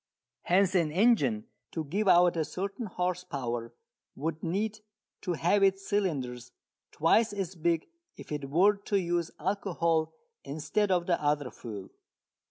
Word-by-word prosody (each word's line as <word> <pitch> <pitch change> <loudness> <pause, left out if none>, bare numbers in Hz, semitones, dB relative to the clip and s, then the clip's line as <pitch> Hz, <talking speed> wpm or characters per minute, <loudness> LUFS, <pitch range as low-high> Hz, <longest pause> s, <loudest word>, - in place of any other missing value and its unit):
Hence 185 +1 +3
an 170 -5 +2
engine 150 - +3 0.3
to 160 - -2
give 195 +8 -1
out 175 -1 +6
a 160 - +1
certain 200 +8 -4
horse 180 -1 -2
power 120 -8 -4 0.4
would 155 +2 -3
need 205 +6 -1 0.4
to 180 - -1
have 175 +5 +2
its 195 0 +2
cylinders 135 - -2 0.4
twice 215 +8 +3
as 195 -3 -3
big 165 -1 0 0.3
if - - -11
it 145 -2 -3
were 195 +8 +4
to 200 0 0
use 175 -2 -1
alcohol 170 -3 0 0.3
instead 155 +9 -1
of 180 -2 +2
the 175 -3 +1
other 145 -3 0
fuel. 105 -5 -8
175 Hz, 145 wpm, -29 LUFS, 150-195 Hz, 0.4 s, out